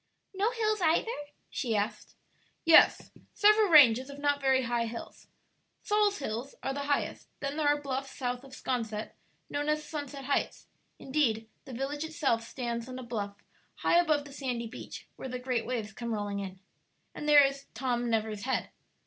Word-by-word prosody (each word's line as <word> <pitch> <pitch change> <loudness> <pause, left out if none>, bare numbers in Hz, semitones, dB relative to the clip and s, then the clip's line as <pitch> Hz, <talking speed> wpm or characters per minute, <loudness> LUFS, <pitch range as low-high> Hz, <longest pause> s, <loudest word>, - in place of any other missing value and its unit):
"No 400 +3 +1
hills 430 -3 0
either?" 335 +7 +2 0.4
she 235 -6 -1
asked. 210 +1 -2 0.5
"Yes, 330 -1 +6 0.2
several 425 0 +5
ranges 260 -5 +7
of 280 - -8
not 285 0 +1
very 265 -1 +3
high 235 -1 0
hills; 230 +1 -8 0.6
Saul's 415 -1 +2
Hills 250 +1 -4
are 270 - -1
the 285 +1 -3
highest; 285 - -1
then 275 0 -3
there 305 -1 +1
are 290 0 +3
bluffs 270 -1 -3
south 250 -1 -2
of 270 -1 -11
'Sconset 225 -4 -3 0.4
known 290 +1 -2
as 305 0 +1
Sunset 285 -3 -6
Heights; 280 - -1 0.3
indeed, 245 -6 0 0.2
the 260 - -9
village 275 +4 -3
itself 290 -7 0
stands 235 0 -4
on 255 - -6
a 255 - -6
bluff 205 -4 -5 0.3
high 340 - +3
above 305 -4 +2
the 280 - -11
sandy 250 -4 -3
beach, 230 +2 -8
where 265 - -6
the 250 - -3
great 250 -2 -2
waves 225 -4 -3
come 235 +1 -5
rolling 205 -1 -3
in. 190 -1 -6 0.5
And 300 - -4
there 290 -1 +9
is 275 0 -3
'Tom 240 -1 -1
Never's 220 -2 -1
Head.' 260 +3 -1
265 Hz, 175 wpm, -30 LUFS, 235-290 Hz, 0.6 s, there